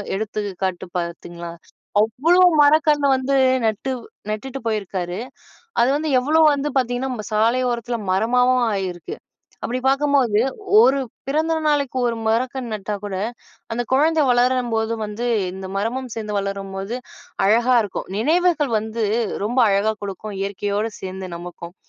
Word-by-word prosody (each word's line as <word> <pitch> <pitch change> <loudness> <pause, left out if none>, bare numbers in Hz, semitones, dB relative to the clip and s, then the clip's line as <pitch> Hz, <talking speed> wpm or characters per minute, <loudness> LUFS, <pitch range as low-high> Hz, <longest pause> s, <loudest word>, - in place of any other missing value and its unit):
எடுத்துக்காட்டு 195 -3 -3
பார்த்தீங்களா? 170 0 -5 0.6
அவ்ளோ 325 +11 +3 0.2
மரக்கன்னு 295 -1 +4
வந்து 265 +1 0 0.3
நட்டு 220 +5 -1 0.4
நட்டுட்டு 265 +6 -4
போயிருக்காரு. 190 -4 -2 0.6
அது 235 - +4
வந்து 310 +1 -2
எவ்ளோ 305 +5 +2
வந்து 285 +1 -1
பார்த்தீங்கன்னா, 255 0 0
நம்ம 220 -4 -5
சாலையோரத்தில 235 +2 +1 0.2
மரமாவும் 250 +5 +3
ஆயிருக்கு. 180 -4 -4 0.5
அப்பிடி 250 +2 -2
பார்க்கும்போது, 275 -5 +3 0.4
1 275 - +4 0.3
பிறந்த 315 +3 +1
நாளைக்கு 285 -3 0
1 230 - -2
மரக்கன்னு 245 +1 -1
நட்டா 210 0 -4
கூட 200 -2 -4 0.6
அந்த 240 +2 -1
குழந்தை 310 +3 +3
வளரும்போது 245 -2 +1
வந்து 210 +4 -4 0.3
இந்த 190 0 -7
மரமும் 245 +4 -3
சேர்ந்து 210 -2 -3
வளரும்போது 195 +2 -4 0.5
அழகா 240 +4 +4
இருக்கும். 200 - -6
நினைவுகள் 315 +1 +2
வந்து 220 +1 -3 0.4
ரொம்ப 240 +5 -1
அழகா 200 +2 +2
கொடுக்கும். 200 +1 -6
இயற்கையோடு 205 +2 -2
சேர்ந்து 190 0 -6
நமக்கும். 175 0 -9
230 Hz, 120 wpm, -21 LUFS, 200-265 Hz, 0.6 s, மரக்கன்னு